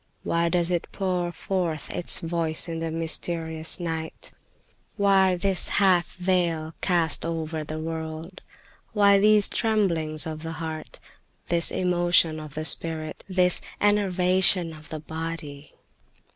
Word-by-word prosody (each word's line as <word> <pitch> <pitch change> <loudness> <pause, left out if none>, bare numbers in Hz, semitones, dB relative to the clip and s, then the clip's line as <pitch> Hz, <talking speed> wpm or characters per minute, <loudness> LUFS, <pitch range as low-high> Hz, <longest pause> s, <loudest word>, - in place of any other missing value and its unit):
Why 170 0 0
does 175 0 0
it 175 -2 -1
pour 180 -3 -2
forth 175 -3 -3
its 175 - +2
voice 165 -1 -2
in 165 -1 -4
the 165 0 -3
mysterious 160 0 -2
night? 160 -2 -6 0.7
"Why 195 -2 +3
this 190 +1 +4
half 185 -4 +3
veil 175 -3 -1
cast 170 -4 +2
over 160 -1 -4
the 155 +1 -6
world? 160 +2 -6 0.5
Why 200 -2 +5
these 210 0 +5
tremblings 165 - 0
of 155 -1 -6
the 165 0 -6
heart, 160 -1 -7 0.5
this 170 -1 +3
emotion 175 -3 +2
of 155 -1 -10
the 155 0 -4
spirit, 155 0 -1
this 180 -1 +5 0.2
enervation 185 -3 +2
of 155 -1 -14
the 155 - -6
body? 160 -2 -7
165 Hz, 130 wpm, -25 LUFS, 160-185 Hz, 0.7 s, Why